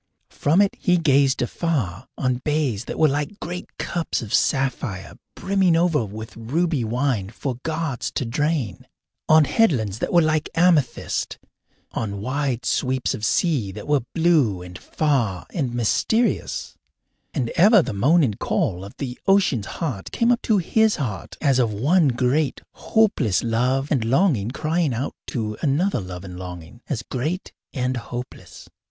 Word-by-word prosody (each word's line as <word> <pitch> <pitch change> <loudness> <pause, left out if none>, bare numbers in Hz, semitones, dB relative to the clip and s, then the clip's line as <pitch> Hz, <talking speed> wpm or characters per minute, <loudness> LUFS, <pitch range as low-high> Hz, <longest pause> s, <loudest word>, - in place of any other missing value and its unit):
From 160 +7 +2
it 200 - -1
he 180 0 +3
gazed 140 -5 +3
afar 125 - -2
on 130 -1 0
bays 145 -8 0
that - - -5
were 155 - +5
like 145 +7 -2
great 180 +1 -5
cups 170 -7 -2
of 105 - -7
sapphire 130 -8 0 0.2
brimming 190 -3 +2
over 165 -5 +2
with 110 +2 -8
ruby 145 +5 -1
wine 115 -3 -1
for 125 +2 -5
gods 160 -5 -2
to 130 - -1
drain, 130 - -2 0.4
on 155 -1 +7
headlands 120 - +1
that - - -2
were 170 -1 +5
like 155 -1 0
amethyst, 165 -7 +1 0.5
on 100 -3 -3
wide 130 +2 -2
sweeps 130 -1 0
of 105 - -6
sea 130 - +1
that 105 +1 -8
were 145 -2 +3
blue 150 - +2
and 90 +1 -10
far 125 - 0
and 130 -8 -2
mysterious; 220 - 0 0.6
and 125 -6 -2
ever 205 +1 +6
the - - -4
moan 150 +12 +4
and 110 -7 -1
call 90 +1 -1
of 100 - -10
the 130 -3 -5
ocean's 185 - +3
heart 130 - -4
came 235 +1 +2
up 240 - +2
to 215 - +2
his 220 +4 +2
heart 115 -9 -5
as 135 -4 +3
of 120 -3 +2
one 150 - +3
great, 130 +4 +1
hopeless 195 - +1
love 125 +4 0
and 135 -7 +2
longing 125 - +2
crying 155 0 0
out 130 +5 -3
to 110 -3 -3
another 155 +3 +1
love 90 -2 -7
and 90 -2 -8
longing, 90 +4 -9
as 115 -6 -2
great 155 +11 -3 0.2
and 130 -2 -1
hopeless. 120 +1 -8
135 Hz, 155 wpm, -23 LUFS, 115-160 Hz, 0.6 s, on